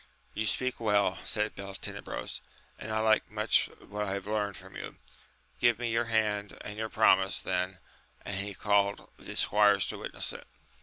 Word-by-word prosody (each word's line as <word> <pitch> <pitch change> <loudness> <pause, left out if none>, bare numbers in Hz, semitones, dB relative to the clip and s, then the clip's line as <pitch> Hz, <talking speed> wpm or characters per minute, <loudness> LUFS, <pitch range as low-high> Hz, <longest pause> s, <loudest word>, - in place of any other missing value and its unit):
You 110 - -1
speak 130 +4 0
well, 105 -3 +2
said 105 0 0
Beltenebrogi, 100 -1 -5 0.4
and 110 - -6
I 110 - 0
like 110 0 +3
much 105 +1 +3
what 105 +1 -6
I 95 - -1
have 100 -1 -4
learnt 105 -1 -1
from - - -13
you; - - -7 0.6
give 120 -2 +4
me 120 -1 -2
your 115 +1 +2
hand 105 -3 0
and 105 - -7
your 110 +1 -3
promise 95 -3 +4
then; 90 0 -1 0.5
and 100 - -3
he 100 0 -3
called 100 0 +1
the - - -8
squires 105 -1 +4
to - - -3
witness - - -2
it. - - -10
105 Hz, 170 wpm, -30 LUFS, 100-110 Hz, 0.6 s, give